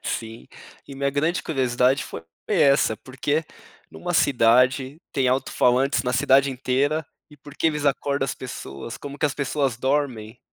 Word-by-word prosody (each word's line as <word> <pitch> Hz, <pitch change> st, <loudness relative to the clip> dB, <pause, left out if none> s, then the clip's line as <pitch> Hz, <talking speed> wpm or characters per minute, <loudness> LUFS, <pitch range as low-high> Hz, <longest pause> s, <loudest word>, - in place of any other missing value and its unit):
Sim, 115 Hz, 0 st, -5 dB, 0.4 s
e 140 Hz, -, -9 dB
minha 140 Hz, 0 st, -1 dB
grande 155 Hz, +5 st, 0 dB
curiosidade 130 Hz, -2 st, +1 dB
foi 80 Hz, -, -8 dB, 0.3 s
essa, 140 Hz, -6 st, +3 dB
porque 145 Hz, +6 st, -2 dB, 0.5 s
numa 175 Hz, 0 st, -5 dB
cidade 130 Hz, +2 st, +3 dB
tem 135 Hz, -2 st, +1 dB
autofalantes 130 Hz, +1 st, +2 dB
na 125 Hz, -1 st, -1 dB
cidade 135 Hz, +4 st, +4 dB
inteira, 135 Hz, +4 st, 0 dB, 0.3 s
e 150 Hz, -, -15 dB
porque 145 Hz, +3 st, -4 dB
eles 150 Hz, -2 st, -1 dB
acordam 140 Hz, 0 st, 0 dB
as 130 Hz, -, -3 dB
pessoas, 115 Hz, -, -8 dB
como 145 Hz, 0 st, -9 dB
que -, -, +2 dB
as 145 Hz, -, -3 dB
pessoas 140 Hz, -3 st, -1 dB
dormem, 130 Hz, -4 st, -2 dB
135 Hz, 150 wpm, -23 LUFS, 125-145 Hz, 0.5 s, cidade